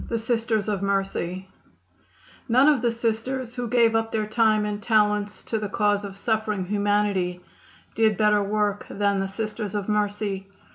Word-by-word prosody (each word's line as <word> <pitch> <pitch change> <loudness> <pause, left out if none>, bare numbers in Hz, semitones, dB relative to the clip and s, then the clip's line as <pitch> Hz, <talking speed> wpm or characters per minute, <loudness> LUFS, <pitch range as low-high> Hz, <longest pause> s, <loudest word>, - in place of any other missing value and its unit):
None - - -8 2.4
of 265 +2 +5
the 240 - +2
Sisters 235 +2 -2
who 245 -1 -4
gave 235 -1 +4
up 225 0 0
their 215 -1 0
time 215 -1 +2
and 210 0 -3
talents 210 -1 +1
to 220 - -2
the 210 -1 -4
cause 205 0 +1
of 195 -1 -7
suffering 215 -3 -1
humanity 200 -2 0 0.5
did 220 -3 +2
better 210 -1 +3
work 205 0 -1
than 200 -1 0
the 195 - -1
Sisters 215 0 -4
of 205 -2 -2
Mercy. 205 -2 -1
210 Hz, 140 wpm, -24 LUFS, 205-225 Hz, 2.4 s, of